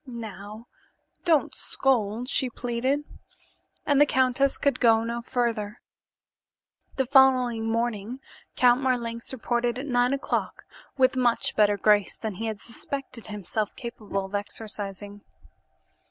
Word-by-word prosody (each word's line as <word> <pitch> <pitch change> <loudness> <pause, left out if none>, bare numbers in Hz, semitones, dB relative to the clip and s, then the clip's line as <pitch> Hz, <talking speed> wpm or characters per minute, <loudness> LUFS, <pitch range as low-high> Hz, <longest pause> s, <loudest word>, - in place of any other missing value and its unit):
"Now, 220 -2 -8 0.6
don't 320 -4 +3
scold," 240 -3 0
she 260 -1 0
pleaded, 245 +4 -1 0.8
and 285 -1 +3
the 295 - +6
countess 260 +1 +2
could 280 -3 +1
go 225 -2 +5
no 235 +1 -3
further. 230 -3 -2 1.2
The 265 - +1
following 255 -4 +4
morning 230 +1 -2 0.4
Count 245 +1 +4
Marlanx 235 -3 -1
reported 240 -1 -1
at 265 - -4
nine 245 -2 +2
o'clock 275 +1 -2 0.3
with 260 0 +4
much 245 -2 +1
better 205 -1 +4
grace 205 -1 +3
than 220 -2 -4
he 225 +4 -4
had 215 -2 -4
suspected 255 +1 -7
himself 210 0 -3
capable 210 -4 -4
of 190 - -12
exercising. 205 -1 -5
235 Hz, 125 wpm, -26 LUFS, 215-255 Hz, 1.2 s, the